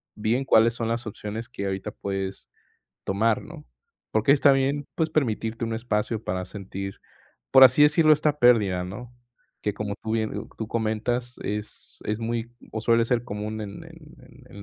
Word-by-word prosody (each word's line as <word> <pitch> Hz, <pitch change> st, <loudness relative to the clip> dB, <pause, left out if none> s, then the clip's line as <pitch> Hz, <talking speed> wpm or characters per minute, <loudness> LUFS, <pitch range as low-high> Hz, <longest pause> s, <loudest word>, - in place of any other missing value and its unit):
bien 115 Hz, +5 st, 0 dB
cuáles 115 Hz, -1 st, +5 dB
son 115 Hz, -1 st, -2 dB
las 115 Hz, 0 st, -2 dB
opciones 110 Hz, +2 st, -6 dB
que 100 Hz, -, -5 dB
ahorita 95 Hz, +2 st, -3 dB
puedes 95 Hz, -1 st, -5 dB, 0.6 s
tomar, 110 Hz, +3 st, +1 dB
¿no?, 155 Hz, -1 st, -11 dB, 0.5 s
porque 110 Hz, +6 st, +4 dB
está 140 Hz, -1 st, +5 dB
bien, 135 Hz, +2 st, +1 dB
pues 160 Hz, -1 st, +1 dB
permitirte 115 Hz, -5 st, -1 dB
un 115 Hz, 0 st, -2 dB
espacio 110 Hz, -1 st, -2 dB
para 90 Hz, 0 st, -2 dB
sentir, 100 Hz, 0 st, -7 dB, 0.5 s
por 130 Hz, -, +10 dB
así 130 Hz, +3 st, +6 dB
decirlo, 155 Hz, +1 st, +6 dB
esta 150 Hz, 0 st, 0 dB
pérdida, 105 Hz, -8 st, +4 dB
¿no?, 120 Hz, +6 st, -8 dB, 0.5 s
que 105 Hz, -1 st, -1 dB
como 100 Hz, -1 st, -3 dB
tú 110 Hz, 0 st, -3 dB
bien 110 Hz, -1 st, -2 dB
tú 110 Hz, -, -3 dB
comentas, 115 Hz, +2 st, -2 dB
es 105 Hz, +1 st, -6 dB
es 105 Hz, +1 st, -2 dB
muy 115 Hz, 0 st, -3 dB, 0.2 s
o 110 Hz, -, -3 dB
suele 115 Hz, +1 st, +3 dB
ser 120 Hz, 0 st, 0 dB
común 105 Hz, 0 st, -5 dB
en 100 Hz, -1 st, -8 dB
en -, -, -16 dB
en -, -, -14 dB
115 Hz, 170 wpm, -25 LUFS, 105-125 Hz, 0.6 s, por